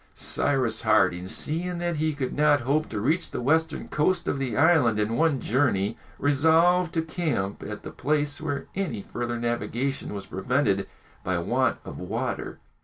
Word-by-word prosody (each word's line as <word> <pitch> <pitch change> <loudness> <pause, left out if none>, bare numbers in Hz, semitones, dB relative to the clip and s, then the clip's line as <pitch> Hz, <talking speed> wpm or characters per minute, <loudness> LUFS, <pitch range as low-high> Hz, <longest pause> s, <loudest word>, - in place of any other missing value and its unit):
Cyrus 125 -6 0
Harding, 95 -4 +2
seeing 170 - -2
that 175 -1 -2
he 155 0 0
could 130 -3 -3
not 145 -1 +3
hope 145 +5 0
to 110 - -3
reach 155 - +1
the - - -4
western 160 +5 +1
coast 165 +5 +1
of 140 - 0
the 130 -3 -2
island 145 -8 +4
in 105 +2 0
one 155 0 +2
journey, 115 -5 +1 0.2
resolved 160 +5 +3
to 165 - +1
camp 160 - -2
at 105 0 -7
the - - -7
place 145 +1 -1
where 145 -3 -3
any 165 - -3
further 120 0 -3
navigation 120 +3 -2
was 100 -1 -6
prevented 100 -1 0 0.4
by 90 -1 0
want 120 +8 +1
of - - -8
water. - - -3
140 Hz, 165 wpm, -26 LUFS, 115-160 Hz, 0.4 s, island